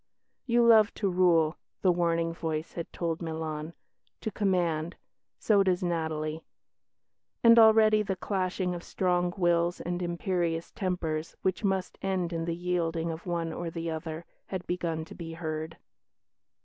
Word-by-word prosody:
"You 235 0 +4
love 220 -2 +6
to 200 -3 0
rule," 170 -3 +3 0.3
the 185 - +5
warning 170 -1 +1
voice 160 -1 -3
had 170 - -6
told 165 -1 -3
Milan 160 -1 -4 0.5
"to 220 - -3
command. 175 -5 0 0.4
So 205 -3 +3
does 185 -1 +1
Natalie"; 160 -2 -2 1.0
and 230 0 +8
already 220 -1 +6
the 195 -2 -2
clashing 185 -1 -1
of 175 - -5
strong 180 -1 0
wills 175 -1 +2
and 175 +1 -3
imperious 170 -1 -1
tempers, 165 -4 -3
which 190 +3 0
must 190 -2 -1
end 185 -3 -1
in 165 0 -2
the 165 -1 -2
yielding 170 -2 -1
of 160 +3 -8
one 170 -2 -2
or 175 0 -4
the 165 0 -4
other, 160 +1 -5 0.2
had 185 -2 -5
begun 165 -3 -2
to - - -11
be 165 -1 -7
heard. 160 -1 -4
175 Hz, 150 wpm, -29 LUFS, 165-185 Hz, 1.0 s, and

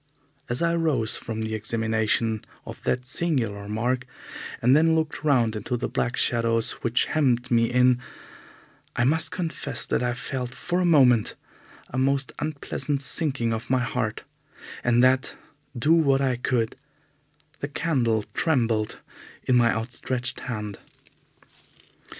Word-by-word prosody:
As 120 +7 -1
I 170 0 +2
rose 150 -10 +1
from 110 -1 -4
the 110 0 -3
examination 110 0 0 0.2
of - - -9
that 125 0 0
singular 120 -10 -1
mark 125 +4 -1 0.5
and 125 +3 +4
then 160 +1 +4
looked 160 -1 -1
round 120 -7 +3
into 110 +4 -2
the 115 - -2
black 125 - -1
shadows 115 -1 +2
which 115 +1 +2
hemmed 125 -5 +1
me 115 -1 +3
in, 125 0 +4 1.0
I 120 - +2
must 160 +5 +2
confess 145 -8 -2
that - - 0
I 120 -1 0
felt 125 -2 -4
for 175 +1 -1
a 180 - +2
moment 130 -9 +4 0.6
a 130 - -2
most 135 0 +1
unpleasant 145 -1 -2
sinking 135 -5 0
of 110 0 -5
my 130 -1 +2
heart, 110 -3 -2 0.6
and 120 0 +4
that, 130 0 +3 0.4
do 150 +7 +3
what 140 -5 +4
I 130 -2 +1
could, 120 -2 -1 0.8
the 145 - -3
candle 125 -8 0
trembled 115 -9 0 0.4
in 125 - +2
my 120 -1 +5
outstretched 125 +3 -3
hand. 105 -5 -5
125 Hz, 140 wpm, -25 LUFS, 115-140 Hz, 1.0 s, my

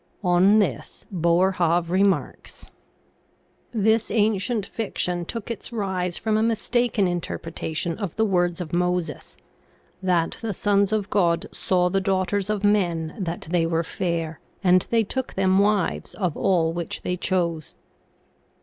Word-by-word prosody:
On 180 +3 +5
this 180 - -1
Boerhaave 170 0 +2
remarks: 195 +1 0 0.6
" - - -40
This 220 0 +2
ancient 215 0 +1
fiction 180 -6 -2
took 230 +4 -5
its 230 - -6
rise 190 -5 -2
from 220 -1 0
a - - +2
mistaken 230 -1 +1
in 175 -1 -1
terpretation 165 0 -3
of 200 -7 -4
the 220 - +2
words 175 -3 +1
of 170 -3 -6
Moses, 180 -3 -1 0.3
* - - -36
That 170 -2 +1
the 220 -4 -3
sons 200 0 +2
of 210 -2 -1
God 170 -4 +2
saw 180 -1 +1
the 195 +2 0
daughters 190 +1 0
of 210 -1 -1
men 175 -6 +1
that 175 -3 -4
they 170 -2 +2
were 165 0 0
fair, 165 -2 -3 0.2
and 180 -1 +4
they 230 -1 +3
took 260 +5 -4
them 190 0 +3
wives 205 -2 0
of 180 -7 -1
all 170 -4 +2
which 170 -1 -5
they 180 - -1
chose. 170 -4 -1
185 Hz, 150 wpm, -24 LUFS, 170-205 Hz, 0.6 s, On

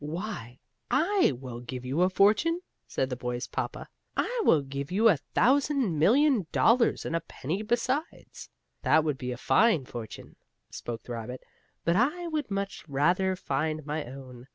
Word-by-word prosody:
"Why, 150 - -5 0.3
I 380 - +3
will 125 -3 -7
give 125 +1 -7
you 135 +7 0
a 180 - +4
fortune!" 215 - +3 0.3
said 130 0 -2
the - - -1
boy's 125 0 -3
papa. - - -4 0.3
"I - - 0
will 150 - +4
give 140 +2 -5
you 215 +5 +4
a 180 - +4
thousand 260 - +1
million 240 - +4
dollars, 235 +1 +3
and 165 - -2
a - - +2
penny 165 +10 -4
besides." 240 +8 -2 0.3
"That 160 - +4
would 150 -4 -1
be 125 -1 -3
a 125 - -5
fine 185 - +3
fortune," 115 -3 -9 0.3
spoke 115 -1 -6
the - - -9
rabbit, 120 +2 -6 0.4
"but 170 - +3
I 300 - +1
would 310 -6 -2
much 200 0 -3
rather 175 +7 +2
find 155 -1 -2
my 150 +1 -3
own. 130 -1 -11
165 Hz, 165 wpm, -28 LUFS, -, 0.4 s, a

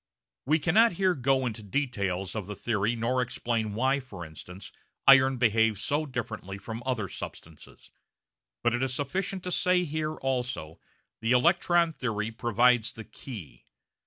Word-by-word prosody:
We 155 +3 +4
cannot 205 +9 +4
here 185 +1 +2
go 135 -2 +1
into 115 -2 -3
the 105 - -14
details 100 -8 -2
of 105 -4 -4
the 105 - -5
theory 110 +1 0
nor 120 +3 0
explain 115 -3 -2
why, 130 +4 +2
for 100 -10 -9
instance, 90 +4 -11 0.3
iron 135 -1 +7
behaves 110 -3 +2
so 150 +2 0
differently 110 -7 -5
from 110 +3 -7
other 115 -6 -1
substances, 80 -3 -10 0.7
but 120 0 +3
it 120 - 0
is 130 -1 0
sufficient 185 +7 -3
to 180 - -4
say 180 0 +3
that 170 - -6
here, 155 +1 -2
also, 125 - -3 0.4
the 115 +2 +1
electron 170 +4 +3
theory 110 -6 -2
provides 120 0 +2
the 110 - -8
key. 105 - -10
120 Hz, 160 wpm, -28 LUFS, 110-140 Hz, 0.7 s, iron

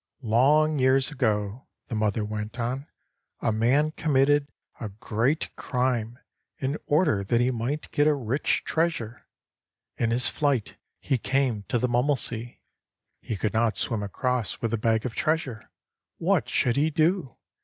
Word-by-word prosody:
"Long 145 +7 +3
years 130 +2 +3
ago," 110 -3 -1 0.2
the - - -8
mother 105 0 0
went 105 +3 -5
on, 130 +5 -2 0.5
"a 115 - +1
man 130 +8 +2
committed 145 -2 +2 0.3
a 110 - -4
great 110 +8 -1
crime 125 -2 -1 0.4
in 140 +3 -2
order 150 - +2
that 115 +4 +1
he 125 +1 +2
might 125 +6 -3
get 145 +1 +3
a 150 - +4
rich 130 +1 0
treasure. 160 -9 -2 0.7
In 115 - +1
his 120 +2 +1
flight 140 -7 0 0.2
he 135 -3 0
came 125 -5 0
to - - +1
the 125 - +1
Mummelsee. 120 -2 -1 0.6
He 110 - -4
could 105 +2 -1
not 115 0 +1
swim 115 -3 -1
across 125 +3 -2
with 115 - -2
the 115 - +1
bag 110 +1 +1
of 125 - -3
treasure! 155 -8 -1 0.5
What - - +1
should 120 0 +1
he 150 +3 +3
do? 160 -3 +1
125 Hz, 150 wpm, -26 LUFS, 110-145 Hz, 0.7 s, a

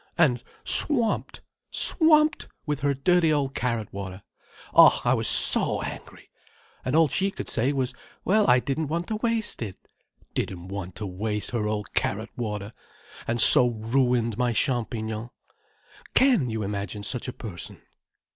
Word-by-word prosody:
And 130 -8 +2 0.2
swamped—swamped 305 +4 +1 0.2
with 150 -2 -2
her 140 0 0
dirty 170 +3 +2
old 140 -3 -1
carrot 115 -5 -3
water. 95 0 -7 0.5
Oh - - +7
I - - +3
was - - +1
so - - +5
angry. - - -10 0.5
And 130 - -2
all 160 -1 +5
she 195 +8 0
could 195 - -8
say 125 +5 0
was, 130 -2 -2 0.3
'Well, 210 +2 +2
I 125 - +5
didn't 140 +4 -3
want 170 +4 -3
to 215 - -2
waste 230 - -2
it!' 100 -5 -6 0.6
Didn't 90 0 -4
want 95 -2 -7
to 105 - -6
waste 105 +3 -3
her 115 -3 -2
old 105 -1 -4
carrot 110 +4 -2
water, 105 -2 -5 0.5
and 120 +1 -1
so 125 +2 +8
ruined 120 0 -1
my 120 -1 +1
champignons. 115 -3 -2 0.9
Can 245 - +3
you 110 -1 -3
imagine 100 0 -5
such 125 +4 -2
a 125 - -5
person?" 95 -7 -9
120 Hz, 145 wpm, -25 LUFS, 105-155 Hz, 0.9 s, so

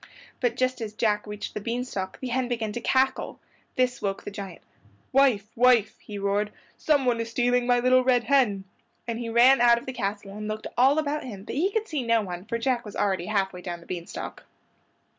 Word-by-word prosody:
But 245 -2 0
just 255 -1 0
as 215 -2 -4
Jack 210 -1 0
reached 210 0 -6
the 210 - -4
bean 240 +3 -2
stalk 190 -6 -5
the 260 - -4
hen 255 +1 0
began 230 -3 -2
to 240 - -5
cackle. 260 +2 +1 0.4
This 250 -1 +1
woke 195 -1 -2
the - - -6
giant. 195 -3 -8 0.5
"Wife, 260 -7 +4
wife," 240 -3 +4
he 210 - -8
roared, 200 +1 0 0.2
"someone 260 -6 +2
is 230 - -4
stealing 245 +1 +1
my 245 0 +4
little 255 +1 +4
red 250 -1 +3
hen," 235 -9 +2 0.4
and 230 -1 -3
he 235 -1 -4
ran 240 +3 +6
out 240 -1 +6
of 235 - -7
the 260 - -5
castle 200 -3 -3
and 210 0 -5
looked 215 0 -4
all 265 +4 +4
about 300 -1 -1
him; 205 -6 -8
but - - -7
he 350 +9 +1
could 440 +1 -1
see 305 -7 -2
no 230 -2 +2
one, 180 -1 -6
for 230 +2 -2
Jack 240 0 0
was 210 -3 -9
already 190 -3 0
half 195 -2 0
way 180 - -8
down 175 -1 -5
the 170 - -16
bean 175 -2 -5
stalk. - - -7
235 Hz, 220 wpm, -26 LUFS, 205-255 Hz, 0.5 s, ran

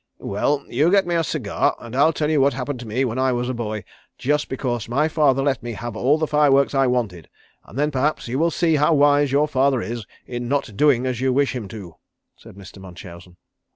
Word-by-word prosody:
"Well, 140 +8 -1
you 155 +4 +2
get 195 +1 +3
me 175 - -2
a 165 -1 +1
cigar, 135 -10 -1
and 120 +1 -9
I'll 145 +4 +4
tell 155 -1 -2
you 150 -3 +3
what 140 0 +3
happened 130 0 -4
to 120 - -9
me 125 +5 0
when 120 +1 -3
I 130 0 +2
was 125 0 -2
a - - -1
boy 110 -4 -4 0.3
just 150 +2 -1
because 120 -4 -3
my 145 +6 +1
father 145 -4 +2
let 135 -4 0
me 120 0 -5
have 115 +1 -6
all 135 +7 +2
the 155 - 0
fire 150 -2 +3
works 140 +1 +3
I 135 -1 +3
wanted, 110 -10 -2 0.4
and 115 - -12
then 150 +1 +1
perhaps 145 +1 -1
you 125 +4 -2
will 165 +2 +3
see 165 -1 +1
how 150 +2 +3
wise 145 -1 +3
your 145 +2 +2
father 135 -2 +1
is 115 0 -5 0.2
in 120 -1 -5
not 135 -5 -2
doing 130 0 +3
as 125 -2 -2
you 130 0 +2
wish 135 0 +1
him 115 -5 -5
to," 95 -6 -10 0.4
said - - -15
Mr. 100 0 -13
Munchausen. 90 -1 -12
130 Hz, 235 wpm, -21 LUFS, 120-145 Hz, 0.4 s, I'll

